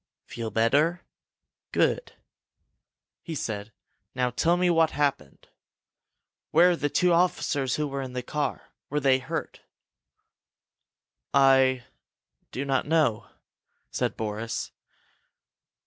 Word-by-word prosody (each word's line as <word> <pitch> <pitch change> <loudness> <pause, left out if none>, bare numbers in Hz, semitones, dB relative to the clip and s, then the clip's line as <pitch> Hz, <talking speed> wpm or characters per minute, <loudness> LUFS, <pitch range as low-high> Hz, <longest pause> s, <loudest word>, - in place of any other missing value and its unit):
"Feel 115 -2 -5
better? 140 - +2 0.7
Good!" - - 0 1.1
he 165 - -6
said. 110 -5 -4 0.4
"Now 125 -1 0
tell 170 +8 +2
me 180 0 +2
what 165 -1 +4
happened! 140 - -2 1.0
Where 175 +3 +5
are - - +1
the 145 -3 -1
two 180 +4 +2
officers 170 -7 +1
who 150 -1 -1
were 140 0 -4
in 130 -1 -6
the 125 0 -4
car? 150 +3 -4 0.2
Were 150 - 0
they 135 -2 +3
hurt?" 130 - -5 1.7
"I 135 -2 +4 0.7
do 135 - -4
not 135 0 0
know," 150 -9 +1 0.6
said - - -2
Boris. 110 +2 -4
135 Hz, 110 wpm, -26 LUFS, 125-160 Hz, 1.7 s, Where